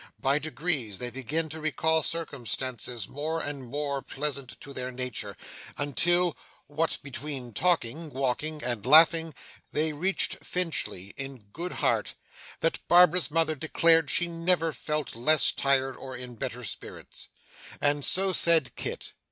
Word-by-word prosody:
By 140 Hz, +2 st, +2 dB
degrees, 150 Hz, -, -2 dB
they 120 Hz, +4 st, -4 dB
began 140 Hz, +6 st, -2 dB
to 160 Hz, +1 st, -7 dB
recall 160 Hz, +1 st, +1 dB
circumstances 125 Hz, -7 st, -3 dB
more 155 Hz, +4 st, -3 dB
and 145 Hz, -3 st, -4 dB
more 140 Hz, 0 st, -2 dB
pleasant 135 Hz, -4 st, -4 dB
in 140 Hz, -, -9 dB
their 130 Hz, -1 st, -4 dB
nature, 125 Hz, -2 st, -5 dB, 0.4 s
until, 175 Hz, +4 st, +2 dB, 0.3 s
what 155 Hz, +3 st, -1 dB
between 140 Hz, -3 st, -6 dB
talking, 160 Hz, -1 st, +1 dB
walking, 140 Hz, +3 st, -2 dB
and 120 Hz, -4 st, -1 dB
laughing, 160 Hz, +3 st, +6 dB, 0.4 s
they 155 Hz, 0 st, +1 dB
reached 185 Hz, +6 st, 0 dB
Finchley 160 Hz, -, -2 dB
in 135 Hz, -1 st, -4 dB
such 100 Hz, 0 st, -30 dB
good 175 Hz, +3 st, -4 dB
heart, -, -, 0 dB, 0.5 s
that 165 Hz, -, +1 dB
Barbara's 175 Hz, -3 st, +6 dB
mother 160 Hz, 0 st, +2 dB
declared 165 Hz, +1 st, +3 dB
she 175 Hz, -, +2 dB
never 165 Hz, -1 st, 0 dB
felt 150 Hz, -4 st, -3 dB
less 150 Hz, +6 st, +4 dB
tired 135 Hz, -1 st, +1 dB
or 130 Hz, -2 st, -8 dB
in 125 Hz, 0 st, -8 dB
better 115 Hz, -, -5 dB
spirits. -, -, -7 dB, 0.5 s
And 145 Hz, 0 st, +1 dB
so 190 Hz, +5 st, +4 dB
said 165 Hz, -6 st, +3 dB
Kit. -, -, -5 dB
145 Hz, 140 wpm, -28 LUFS, 130-165 Hz, 0.5 s, laughing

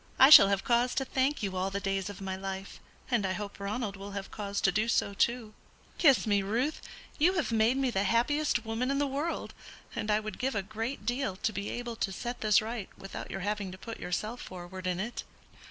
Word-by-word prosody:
I 265 Hz, +2 st, +8 dB
shall 195 Hz, -, +12 dB
have 195 Hz, -1 st, 0 dB
cause 245 Hz, +1 st, +2 dB
to 270 Hz, -, 0 dB
thank 265 Hz, 0 st, 0 dB
you 195 Hz, -2 st, -2 dB
all 185 Hz, +1 st, 0 dB
the 195 Hz, +1 st, -3 dB
days 195 Hz, 0 st, -2 dB
of 200 Hz, -1 st, -9 dB
my 190 Hz, -1 st, -3 dB
life, 195 Hz, 0 st, -6 dB, 0.3 s
and 235 Hz, -4 st, +2 dB
I 190 Hz, -1 st, 0 dB
hope 205 Hz, 0 st, -6 dB
Ronald 200 Hz, +1 st, -3 dB
will 200 Hz, +1 st, -8 dB
have 200 Hz, -1 st, -5 dB
cause 200 Hz, -1 st, -3 dB
to 195 Hz, -, +4 dB
do 215 Hz, +5 st, +1 dB
so 200 Hz, -3 st, +1 dB
too. 230 Hz, +1 st, 0 dB, 0.5 s
Kiss 280 Hz, -8 st, +5 dB
me, 205 Hz, -2 st, +2 dB
Ruth; 235 Hz, +10 st, -1 dB, 0.4 s
you 345 Hz, +5 st, +5 dB
have 330 Hz, -9 st, -1 dB
made 225 Hz, +3 st, +3 dB
me 265 Hz, -2 st, +1 dB
the 195 Hz, -, +1 dB
happiest 240 Hz, +3 st, +1 dB
woman 225 Hz, +3 st, -1 dB
in 275 Hz, -, +1 dB
the 285 Hz, -, +2 dB
world, 285 Hz, +5 st, -3 dB, 0.4 s
and 210 Hz, -, -3 dB
I 210 Hz, 0 st, +4 dB
would 215 Hz, 0 st, -7 dB
give 265 Hz, -1 st, -1 dB
a 200 Hz, -, 0 dB
great 220 Hz, +4 st, -5 dB
deal 245 Hz, -4 st, -1 dB
to 215 Hz, +3 st, -2 dB
be 200 Hz, +1 st, -4 dB
able 240 Hz, -1 st, -4 dB
to 195 Hz, -, -1 dB
set 240 Hz, +6 st, -5 dB
this 215 Hz, -1 st, +4 dB
right 225 Hz, -3 st, -5 dB
without 195 Hz, -, -7 dB
your 195 Hz, -, -5 dB
having 205 Hz, -1 st, -2 dB
to -, -, -9 dB
put 230 Hz, +3 st, -8 dB
yourself 215 Hz, +7 st, -3 dB
forward 185 Hz, 0 st, -7 dB
in 180 Hz, 0 st, -1 dB
it." 235 Hz, +5 st, -4 dB
215 Hz, 230 wpm, -30 LUFS, 195-245 Hz, 0.5 s, shall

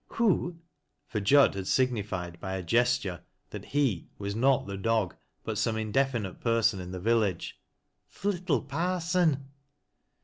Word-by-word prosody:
" -, -, -46 dB
Who? 180 Hz, -6 st, +2 dB, 0.2 s
" -, -, -51 dB
for 110 Hz, -, -1 dB
Jud 140 Hz, +8 st, +5 dB
had 95 Hz, -1 st, -5 dB
signified 100 Hz, -9 st, 0 dB
by 95 Hz, -, -4 dB
a 95 Hz, -, -4 dB
gesture 120 Hz, -2 st, +1 dB, 0.3 s
that -, -, -9 dB
lu 130 Hz, -, +2 dB, 0.2 s
was 100 Hz, 0 st, -4 dB
not 130 Hz, +4 st, +3 dB
the 100 Hz, -, -5 dB
dog, 105 Hz, -2 st, 0 dB, 0.3 s
but -, -, -3 dB
some 110 Hz, -1 st, 0 dB
indefinite 110 Hz, -2 st, -1 dB
person 115 Hz, -3 st, +2 dB
in 90 Hz, -1 st, -6 dB
the 90 Hz, 0 st, -5 dB
villaga 105 Hz, -3 st, +1 dB, 0.6 s
"Th' -, -, -14 dB
little 180 Hz, -, +1 dB
Parson." 165 Hz, -4 st, 0 dB
115 Hz, 150 wpm, -29 LUFS, 100-140 Hz, 0.6 s, Jud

